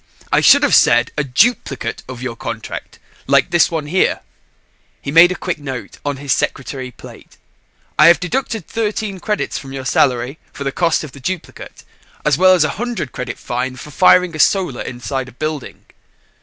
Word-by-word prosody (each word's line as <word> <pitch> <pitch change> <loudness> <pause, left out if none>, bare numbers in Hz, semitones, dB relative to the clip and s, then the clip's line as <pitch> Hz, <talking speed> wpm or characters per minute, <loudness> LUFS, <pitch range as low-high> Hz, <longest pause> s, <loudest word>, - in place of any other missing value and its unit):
"I - - +4
should 285 +1 +6
have 285 - +2
said 120 0 +5
a 150 - 0
duplicate 140 - 0
of 130 -1 -7
your 125 -2 -4
contract 115 -1 -7 0.3
like - - +3
this 175 - +4
one 160 -3 -3
here." 185 +5 +1 0.8
He 140 - -5
made 165 +3 +7
a - - -2
quick 175 -3 -4
note 135 -4 -7
on 145 -1 -2
his 140 0 0
secretary 130 -1 -3
plate. 125 - -14 0.6
"I 150 - +8
have 170 - +6
deducted 220 +1 -3
13 215 -3 -3
credits 210 +3 -2
from 135 -1 -10
your 135 -1 -6
salary 130 +1 +1
for 140 - -6
the 135 - -2
cost 170 +2 +1
of 155 - -8
the 140 - -13
duplicate 180 +6 -6 0.4
as - - +3
well 185 +1 +5
as 175 - +3
a 155 - 0
100 240 - -3
credit 125 -1 -5
fine 125 +1 -3
for 150 +4 -10
firing 180 +1 +4
a - - -7
Solar 180 -7 +2
inside 130 +1 -4
a - - -17
building." 155 +1 -5
145 Hz, 185 wpm, -18 LUFS, 130-180 Hz, 0.8 s, I